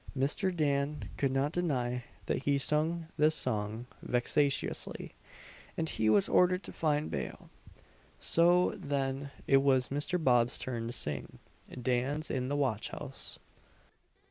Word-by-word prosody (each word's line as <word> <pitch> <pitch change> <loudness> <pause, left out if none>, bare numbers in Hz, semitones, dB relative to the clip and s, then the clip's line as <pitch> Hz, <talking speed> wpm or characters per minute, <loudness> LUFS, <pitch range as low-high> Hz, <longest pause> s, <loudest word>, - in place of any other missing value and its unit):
Mr. 145 +8 +1
Dan 145 -3 -1
could 135 - +1
not 135 +2 +1
deny 125 -8 -1 0.2
that - - -1
he 140 -1 +3
sung 155 +4 +1
this 155 +1 +4
song 110 +2 -2 0.2
vexatiously, 135 +3 0 0.7
and 160 -1 0
he 110 0 +1
was 105 -2 +4
ordered 180 +1 +3
to - - -8
find 150 -1 0
bail 70 -2 -5 0.7
So, 175 +2 +4
then, 140 -1 -2 0.2
it 135 - +5
was 135 -2 +3
Mr. 145 +6 0
Bob's 120 -2 +4
turn 115 -3 -4
to - - -3
sing 75 - -1 0.4
"Dan's 130 +5 -1
in 130 -1 -1
the 145 - -1
watch 130 -7 0
house." - - -5
140 Hz, 135 wpm, -31 LUFS, 125-150 Hz, 0.7 s, it